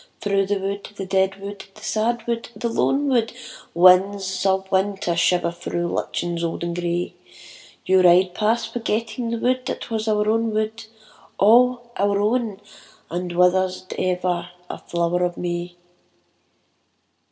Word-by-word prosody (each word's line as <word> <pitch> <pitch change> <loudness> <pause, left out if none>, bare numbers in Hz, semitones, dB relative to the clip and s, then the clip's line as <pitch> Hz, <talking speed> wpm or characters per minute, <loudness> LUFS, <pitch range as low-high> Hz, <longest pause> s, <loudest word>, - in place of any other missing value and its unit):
Through 195 -1 +1
the 205 0 +1
wood, 195 +1 -4
the 195 - -5
dead 190 0 +1
wood, 200 0 -7
the - - -15
sad 230 +1 -1
wood, 235 -1 -3
the 235 - -2
lone 275 +5 +1
wood, 235 -4 +1 0.4
Winds 185 +1 +4
of 190 0 +1
winter 190 -2 0
shiver 170 0 +2
through 175 0 -3
lichens 170 0 -2
old 170 0 -3
and 170 0 -3
grey, 175 0 -2 0.7
You 190 0 +4
ride 180 +1 +5
past 225 +3 0
forgetting 230 +1 -2
the 235 - -1
wood 255 +2 0
that - - -5
was 220 0 -2
our 210 -1 +1
own 225 0 +1
wood, 220 +1 -2 0.5
All 240 +3 +4
our 200 0 +2
own 215 -1 0 0.5
and 175 +1 -3
withered 180 +2 +4
as 185 0 -8
ever 180 -1 -1 0.2
a - - -7
flower 170 +1 -1
of 175 -1 -1
May. 175 0 -4
195 Hz, 150 wpm, -22 LUFS, 180-225 Hz, 0.7 s, ride